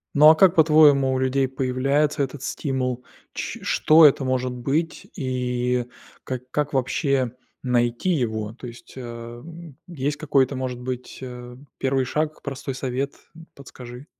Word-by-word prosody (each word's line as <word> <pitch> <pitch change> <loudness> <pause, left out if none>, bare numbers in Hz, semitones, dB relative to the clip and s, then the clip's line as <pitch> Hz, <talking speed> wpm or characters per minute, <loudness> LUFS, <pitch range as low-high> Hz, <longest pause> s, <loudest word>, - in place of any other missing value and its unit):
Ну, 150 +1 +8
а 160 - +7
как 190 +1 +5
по-твоему 150 -4 +5
у 130 - 0
людей 130 +1 +1
появляется 135 +3 0
этот 135 0 -5
стимул? 130 -3 -2 0.3
Ч - - -5
что 155 +1 +5
это 140 -1 +5
может 130 -1 0
быть 145 +7 -2
и 125 -2 -1 0.4
ка 130 -1 -4
как 150 +2 -2
вообще 130 -1 0 0.3
найти 120 +5 0
его? 110 -9 -1
То 130 - -11
есть, 120 0 -13
а, 120 -1 -8 0.4
есть 150 -4 -3
какой-то 140 -3 +1
может 130 -1 -4
быть, 125 0 -6
а, 125 -1 -8 0.2
1 135 -1 0
шаг, 150 +4 -2
простой 135 -1 -5
совет? 130 +2 -3 0.2
Э. - - -13
Подскажи. 125 -1 -11
130 Hz, 145 wpm, -23 LUFS, 125-145 Hz, 0.4 s, Ну